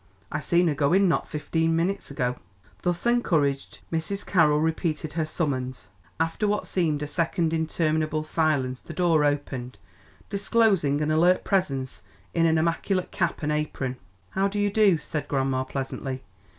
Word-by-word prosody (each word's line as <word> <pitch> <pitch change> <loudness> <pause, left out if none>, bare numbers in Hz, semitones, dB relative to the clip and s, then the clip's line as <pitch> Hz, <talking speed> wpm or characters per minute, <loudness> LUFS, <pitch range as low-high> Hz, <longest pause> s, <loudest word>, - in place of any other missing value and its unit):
I 150 - -1
seen 170 +3 +2
her 155 - +2
go 145 +2 +1
in 195 +1 +5
not 170 - +1
fifteen 160 +1 0
minutes 185 +4 -1
ago." 125 -3 -1 0.4
Thus 175 +2 -1
encouraged 160 - +1
Mrs. 165 +5 -3
Carroll 150 -5 +4
repeated 155 -1 -1
her 160 -1 -1
summons. 130 -6 -3 0.3
After 165 +6 0
what 210 0 0
seemed 155 -5 0
a - - -1
second 165 +1 0
interminable 155 -1 0
silence 150 -5 0
the 170 - -10
door 165 -4 +3
opened, 135 -4 -2 0.5
disclosing 200 -8 +2
an 150 0 +1
alert 175 +4 +4
presence 135 - -1 0.3
in 165 -1 +3
an 160 0 +3
immaculate 175 +3 0
cap 170 -5 -1
and 150 - 0
apron. 145 -4 -2 0.3
"How 195 +1 +1
do 205 +1 -3
you 205 0 +1
do?" 200 -4 +4
said 150 -1 -4
grandma 135 -1 0
pleasantly. 130 0 -4
160 Hz, 155 wpm, -26 LUFS, 145-175 Hz, 0.5 s, in